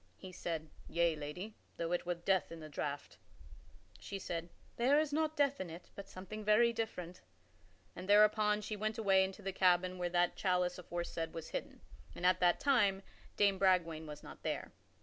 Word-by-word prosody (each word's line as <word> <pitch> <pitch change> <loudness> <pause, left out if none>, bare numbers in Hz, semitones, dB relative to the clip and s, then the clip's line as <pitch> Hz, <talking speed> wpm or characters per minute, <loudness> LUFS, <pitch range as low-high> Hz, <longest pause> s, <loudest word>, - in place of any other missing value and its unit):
He 185 - -9
said, 165 -3 -4 0.2
"Yea, 170 -1 +2
lady, 155 +8 -6 0.2
though 170 0 -2
it 175 0 -1
were 175 - 0
death 180 +1 +1
in 165 - -7
the 155 -1 -9
draught." 145 -1 -5 0.8
She 200 - -6
said, 170 -2 -4 0.3
"There 270 +5 +4
is 305 -2 0
not 315 0 0
death 280 -3 +2
in 185 - -5
it, 170 +2 -10
but 200 -1 -9
something 205 +4 -7
very 225 +3 +5
different," 180 -6 -4 0.7
and 185 +2 -8
thereupon 210 0 +5
she 215 +1 -4
went 215 +1 -2
away 195 -3 +4
into 190 +2 -5
the 195 0 -3
cabin 185 0 +3
where 175 0 0
that 175 0 +2
chalice 180 -1 +1
aforesaid 170 -2 -4
was 165 -1 -6
hidden. - - -5 0.3
And 180 - -4
at 185 0 +5
that 175 -1 +4
time 205 -9 +3 0.3
Dame 200 -2 +3
Bragwaine 170 -4 +2
was 150 -1 -9
not - - -11
there. - - -3
185 Hz, 185 wpm, -35 LUFS, 170-210 Hz, 0.8 s, very